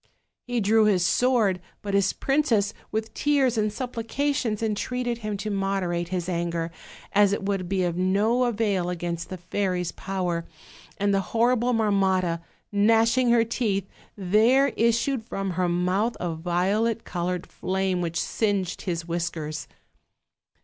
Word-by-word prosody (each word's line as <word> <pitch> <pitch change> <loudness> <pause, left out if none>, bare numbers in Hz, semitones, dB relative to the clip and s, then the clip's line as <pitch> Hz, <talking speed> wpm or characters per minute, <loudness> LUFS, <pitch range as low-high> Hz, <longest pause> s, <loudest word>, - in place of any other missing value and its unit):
He 245 -1 0
drew 215 +2 +4
his 185 -4 +3
sword; 220 -6 +2 0.2
but 200 -1 -3
his 200 -1 +3
princess, 260 -8 +1 0.2
with 220 0 -3
tears 275 -3 +2
and 215 -1 +1
supplications, 245 0 -2
entreated 240 +3 -2
him 215 -2 -3
to 215 +2 -4
moderate 195 -3 -1
his 180 -1 -3
anger, 170 -2 -2 0.4
as 200 -1 +5
it 205 - -2
would 195 -3 -2
be 190 -1 +1
of 175 -1 0
no 205 +7 +2
avail 205 -6 0
against 170 -1 -4
the 185 - -5
fairy's 180 0 -2
power, 180 -3 -2 0.5
and 205 -1 +1
the 195 - +2 0.2
horrible 240 +1 +3
Marmotta, 190 -6 +1 0.3
gnashing 225 +4 +3
her 235 -1 +5
teeth, 210 -5 -1 0.3
there 220 +9 +4
issued 235 +2 +1
from 195 -3 -3
her 180 0 0
mouth 185 +6 0
a 175 -2 -2
violet 190 +7 0
colored 180 0 -3
flame, 190 -1 -1
which 170 -1 -2
singed 200 -4 -1
his 170 -3 -3
whiskers. 165 -2 -3
200 Hz, 140 wpm, -25 LUFS, 180-225 Hz, 0.5 s, as